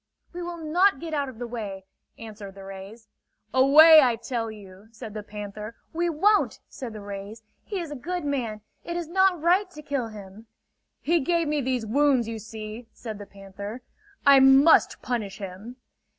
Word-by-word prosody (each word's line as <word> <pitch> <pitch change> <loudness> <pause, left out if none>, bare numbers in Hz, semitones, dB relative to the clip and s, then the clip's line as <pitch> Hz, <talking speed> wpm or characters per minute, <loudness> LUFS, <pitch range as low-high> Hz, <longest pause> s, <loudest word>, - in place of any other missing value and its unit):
"We 355 - -6
will 345 0 -5
not 335 +2 +2
get 325 0 -6
out 285 -2 -1
of 250 - -12
the 245 - -5
way," 205 -5 -6 0.3
answered 210 -3 -10
the 195 - -11
rays. 195 +4 -10 0.5
"Away, 305 +4 +8
I 245 -4 +3
tell 230 0 -4
you!" 200 -1 -13
said 225 -2 -9
the 215 - -5
panther. 210 +1 -8 0.2
"We 345 +1 0
won't!" 405 +7 +2
said 245 -4 -8
the 215 - -8
rays. 200 +2 -8 0.2
"He 405 -3 -4
is 335 -4 -6
a - - -5
good 345 +5 -4
man. 240 -7 -2 0.2
It 345 0 -4
is 345 -2 -4
not 380 0 +3
right 360 +5 +2
to 305 -4 -12
kill 280 -5 -2
him!" 210 0 -12 0.5
"He 335 +2 +2
gave 335 +3 0
me 295 -1 0
these 255 -3 -1
wounds 260 0 +2
you 225 -1 -5
see," 220 +1 -8
said 220 -3 -8
the 205 - -9
panther. 200 +4 -9 0.4
"I 280 -1 +8
must 270 +4 +5
punish 215 -6 -3
him!" 200 +5 -8
240 Hz, 180 wpm, -25 LUFS, 210-305 Hz, 0.5 s, Away